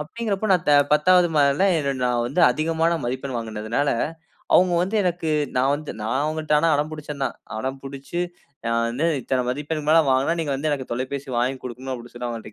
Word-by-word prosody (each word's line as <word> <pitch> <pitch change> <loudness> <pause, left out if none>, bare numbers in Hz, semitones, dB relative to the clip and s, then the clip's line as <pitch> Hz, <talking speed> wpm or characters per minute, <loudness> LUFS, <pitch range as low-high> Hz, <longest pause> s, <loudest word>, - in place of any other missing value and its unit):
அப்படின்கிறப்போ 210 +5 -3
நான் 180 - +2
த - - +6 0.2
10வது 175 +3 +5
மாத 145 +1 +3
நா - - +2 0.2
வந்து 145 +9 -1
அதிகமான 165 +1 +1
மதிப்பெண் 130 +2 -3
வாங்கினதினால, 115 +4 -2 0.7
அவுங்க 180 -1 +5
வந்து 195 +5 -1
எனக்கு 175 -2 -1 0.3
நான் 135 +2 +3
வந்து 150 0 -6
நான் 115 +5 0
அவங்கள்ட்ட 155 0 +1
அடம் 150 +2 0
பிடிச்சேன் 150 -2 -6
தான், - - -3 0.2
அடம்பிடிச்சு 135 +5 -5 0.5
நான் 115 0 +1
வந்து 125 +7 -2 0.2
இத்தனை 130 +1 0
மதிப்பெண்க்கு 150 +3 -3
மேல 165 - +7
வாங்கினா, 135 +6 +2
நீங்க 145 -3 -2
வந்து 155 +3 -1
எனக்கு 135 -4 -3
தொலைபேசி 130 +3 -4
வாங்கிக் 130 +2 -1
குடுக்கணும், 130 +1 -6
அப்படினு 120 -1 -10
சொல்லி 120 0 -4
அவங்கள்ட்ட 115 -2 -7
140 Hz, 175 wpm, -23 LUFS, 130-160 Hz, 0.7 s, மேல